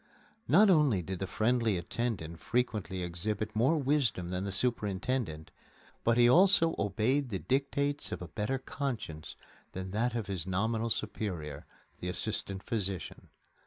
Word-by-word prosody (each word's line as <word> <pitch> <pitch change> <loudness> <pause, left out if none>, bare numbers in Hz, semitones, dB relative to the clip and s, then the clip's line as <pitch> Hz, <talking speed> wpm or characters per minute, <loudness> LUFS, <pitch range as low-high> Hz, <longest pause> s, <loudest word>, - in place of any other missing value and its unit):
Not 195 - +6
only 145 - +4
did 95 +1 -5
the 95 - -2
friendly 115 0 +1
attendant 85 -3 -3
frequently 105 -5 -1
exhibit 105 +5 -3
more 130 +9 +3
wisdom 135 - +1
than 90 +1 -2
the 100 - -2
superintendent, 100 -5 -1 0.5
but 115 0 +3
he 120 0 +7
also 165 +3 +5
obeyed 115 +7 +1
the 100 - -2
dictates 140 +5 0
of - - -3
a 90 - -7
better 105 +9 -2
conscience 125 - -5 0.4
than 95 0 -5
that 115 +4 0
of 115 -3 -1
his 95 -2 -4
nominal 110 +5 0
superior, 90 -9 -3 0.3
the 90 - -3
assistant 100 0 0
physician. 100 -5 -4
110 Hz, 140 wpm, -31 LUFS, 95-125 Hz, 0.5 s, he